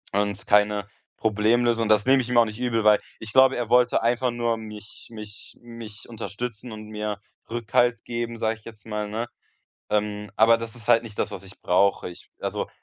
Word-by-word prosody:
Und 100 -1 -1
keine 105 -1 +3 0.3
Problemlösung. 115 +2 +2
Das 105 -1 +4
nehme 135 0 +5
ich 120 - -6
ihm 125 - +1
auch 120 - +7
nicht 110 +1 -7
übel, 120 -3 0
weil 105 -1 +6 0.2
ich 110 -2 -7
glaube, 130 +1 +6
er 120 -2 -3
wollte 125 0 +4
einfach 120 +2 +1
nur 120 -1 0
mich 105 -1 -11
mich 105 -2 -11
mich 115 -3 -10
unterstützen 115 +2 -6
und 110 0 -8
mir 105 -1 -4 0.3
Rückhalt 120 0 +1
geben, 115 -1 -4
sage 110 0 0
ich 110 - -25
jetzt 110 -3 -12
mal, 105 -1 -3
ne? 115 +3 -3 0.6
Ähm, 105 0 -1
aber 115 +1 +6
das 115 0 -7
ist 115 -3 -10
halt 120 -1 +5
nicht 110 -3 -9
das, - - 0
was - - -7
ich 95 +1 -15
brauche. 95 +1 +2
Ich 90 - -14
also, - - -3
110 Hz, 195 wpm, -25 LUFS, 105-120 Hz, 0.6 s, auch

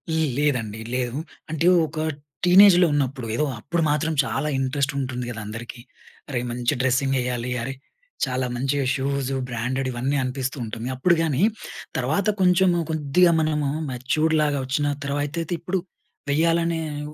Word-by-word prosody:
ల్ 160 -1 +2
లేదండి, 115 -7 0
లేదు. 125 +1 -2 0.3
అంటే, 160 +2 -1 0.2
ఒక 155 +1 -6 0.5
టీనేజ్‌లో 180 -1 +7
ఉన్నప్పుడు, 135 -4 -1
ఏదో 150 - +1
అప్పుడు 170 +8 -2
మాత్రం 150 +2 +1
చాలా 150 +3 -2
ఇంట్రెస్టుంటుంది 135 -2 -1
గదా 115 -1 -5
అందరికీ. 115 +3 -7 0.5
అరేయ్! 125 -2 -2
మంచి 120 +3 0
డ్రెస్సింగెయ్యాలి, 125 -2 0
అరే! 135 +3 -3 0.5
చాలా 130 -1 -1
మంచిగా 135 +2 0
షూజు, 135 0 -1
బ్రాండెడివన్నీ 130 +3 -1
అనిపిస్తూ 130 +2 -3
ఉంటుంది. 115 +2 -5
అప్పుడు 170 +7 +3
గానీ, 155 -3 0 0.6
తర్వాత 150 - 0
కొంచెము 180 -1 +4
కొద్దిగా 160 +3 +3
మనము 150 -2 0 0.2
మెచ్యూర్డ్‌లాగా 150 +3 +1
వచ్చిన 145 +3 0 0.2
తర్వా 140 +1 -1
అయితే 165 +3 -3
ఇప్పుడు, 185 +2 -1 0.5
వేయాలనే 165 +1 +2 0.3
ఉ - - -13
140 Hz, 130 wpm, -24 LUFS, 125-160 Hz, 0.6 s, టీనేజ్‌లో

